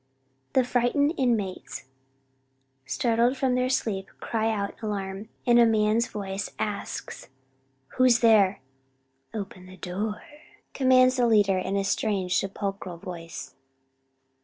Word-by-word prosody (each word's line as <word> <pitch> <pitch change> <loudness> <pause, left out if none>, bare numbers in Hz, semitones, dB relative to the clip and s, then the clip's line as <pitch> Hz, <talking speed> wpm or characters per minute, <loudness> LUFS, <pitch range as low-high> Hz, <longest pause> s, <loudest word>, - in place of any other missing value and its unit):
The 260 - +4
frightened 250 +5 +1
inmates, 225 - -1 1.0
startled 230 - +1
from 260 -1 +1
their 250 0 +1
sleep, 195 -6 -1
cry 225 0 -1
out 200 -2 -2
in - - -26
alarm, 205 -1 -4 0.2
and 240 -1 +5
a 235 - +7
man's 220 +1 +2
voice 195 -1 -4
asks, 205 -9 -5 0.7
"Who's 255 -2 +6
there?" 210 - +4 0.7
"Open 190 -4 -7
the 185 0 -13
door," 205 +4 -4 0.5
commands 255 -1 +4
the 245 -1 +3
leader 205 -4 +4
in 195 +2 -2
a 195 - +1
strange 195 -2 0
sepulchral 195 -2 -4
voice. 170 -2 -8
210 Hz, 120 wpm, -26 LUFS, 195-240 Hz, 1.0 s, a